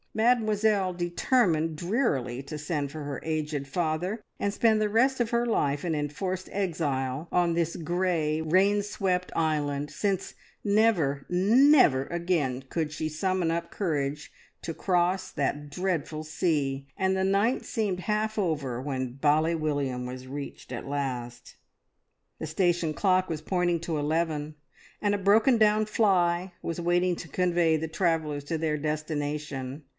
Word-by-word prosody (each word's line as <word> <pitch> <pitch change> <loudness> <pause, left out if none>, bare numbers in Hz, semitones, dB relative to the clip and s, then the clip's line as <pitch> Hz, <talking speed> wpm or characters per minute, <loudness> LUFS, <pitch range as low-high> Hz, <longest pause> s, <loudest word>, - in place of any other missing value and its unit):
Mademoiselle 220 -4 +2
determined 175 - +1
drearily 150 - 0
to 150 +2 -6
send 145 -2 -2
for 155 0 -6
her 145 -3 -5
aged 155 -3 -2
father, 175 +7 -2 0.2
and 200 - +1
spend 220 -1 +3
the 210 - +1
rest 250 +4 +3
of 235 - 0
her 235 0 +1
life 145 -10 0
in 165 -2 0
enforced 180 +6 -3
exile 155 -6 -2
on 175 -1 +2
this 170 0 0
grey, 170 -2 0
rain 190 +6 +3
swept 185 -3 -1
island, 150 -3 0
since 195 +1 -2 0.3
never, 200 -10 +2
never 205 - +5
again 170 -7 -1
could 155 +1 -2
she 155 0 -3
summon 175 +2 0
up 170 0 -3
courage 150 -6 -2 0.3
to 165 - -4
cross 180 +2 0
that 145 0 -2
dreadful 160 -3 -2
sea, 145 -4 -1
and 190 0 +1
the 190 - 0
night 200 +6 +2
seemed 200 -5 -2
half 215 +2 -1
over 145 -10 -1
when 130 -3 -3
Bally 155 +4 +2
William 145 -5 -1
was 130 +1 -8
reached 140 -1 -7
at 120 - -6
last. 125 -4 -4 0.8
The 160 - -5
station 170 -1 +1
clock 185 +1 +2
was 155 -2 -3
pointing 175 0 0
to 165 -2 -2
eleven, 155 0 -1 0.5
and 205 -1 +2
a - - -3
broken 220 +6 +4
down 215 0 +4
fly 185 -4 +2
was 165 +1 -3
waiting 175 +1 +2
to 165 - -8
convey 175 -1 +2
the 160 +1 -3
travellers 160 -3 0
to 165 +2 -2
their 155 -1 0
destination. 150 -2 -3
165 Hz, 145 wpm, -27 LUFS, 145-190 Hz, 0.8 s, never